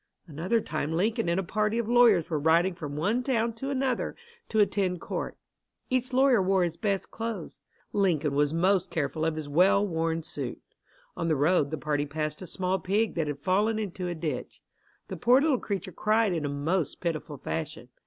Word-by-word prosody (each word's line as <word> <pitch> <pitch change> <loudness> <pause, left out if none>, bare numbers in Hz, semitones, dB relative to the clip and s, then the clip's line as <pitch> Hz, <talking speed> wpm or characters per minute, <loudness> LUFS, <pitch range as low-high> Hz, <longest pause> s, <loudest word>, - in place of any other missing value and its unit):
Another 175 +8 0
time 155 -5 -3
Lincoln 210 +4 0
and 170 +2 +1
a - - -1
party 215 +4 0
of 235 -2 -1
lawyers 235 -8 +5
were 155 -3 -1
riding 165 +5 +3
from 150 -4 -6
one 205 +11 +1
town 235 -3 0
to 270 +5 -5
another 265 -2 -1 0.3
to 220 - -2
attend 195 -3 +2
court. - - -4 0.5
Each 255 0 0
lawyer 260 -3 +4
wore 190 0 +2
his 170 -2 -1
best 195 +1 -2
clothes. 225 -6 -5 0.3
Lincoln 165 -8 +1
was 145 +1 +2
most 185 +2 +2
careful 155 -2 -2
of 160 -1 0
his 155 -2 -5
well 185 +7 +4
worn 165 -2 -1
suit. 145 -6 -5 0.6
On 165 -1 -2
the 160 - +2
road 150 +1 +2
the 160 - -3
party 150 -1 -1
passed 150 +2 -3
a 185 - -6
small 185 +2 -1
pig 210 +4 0
that 160 -3 -1
had 145 -1 -3
fallen 210 +6 +2
into 190 -4 -3
a 175 - -3
ditch. 155 -6 -5 0.4
The 190 - -6
poor 245 +10 +5
little 285 -4 +2
creature 195 -2 -4
cried 215 +2 +2
in 160 -3 -2
a - - -1
most 145 +3 -1
pitiful 160 -3 -3
fashion. 155 -4 -5
180 Hz, 195 wpm, -28 LUFS, 155-215 Hz, 0.6 s, lawyers